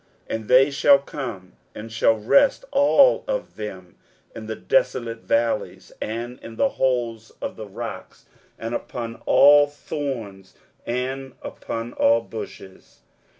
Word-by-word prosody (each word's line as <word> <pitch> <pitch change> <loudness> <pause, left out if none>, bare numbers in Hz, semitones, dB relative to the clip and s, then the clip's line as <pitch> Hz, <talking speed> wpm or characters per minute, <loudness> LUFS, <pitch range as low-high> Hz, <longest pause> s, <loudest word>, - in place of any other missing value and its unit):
23:007:019 - - -1
And 110 -1 -6
they 130 +3 +5
shall 140 0 +5
come, 120 -10 -7 0.2
and 110 +1 -8
shall 110 0 +3
rest 275 - +3
all 290 - +5
of - - -3
them - - -8 0.4
in - - -8
the - - -4
desolate 120 - 0
valleys, 115 0 -1
and 120 +3 -5
in 115 - -10
the 185 - +2
holes 120 -6 -1
of - - -5
the 110 - -8
rocks, 115 +4 -8 0.3
and 115 +1 -5
upon 115 -1 -5
all 145 +1 +7
thorns, 125 -10 -6 0.3
and 130 +2 -3
upon 115 +1 -6
all 115 +1 +3
bushes. 105 -4 -10
120 Hz, 135 wpm, -23 LUFS, 115-140 Hz, 0.4 s, all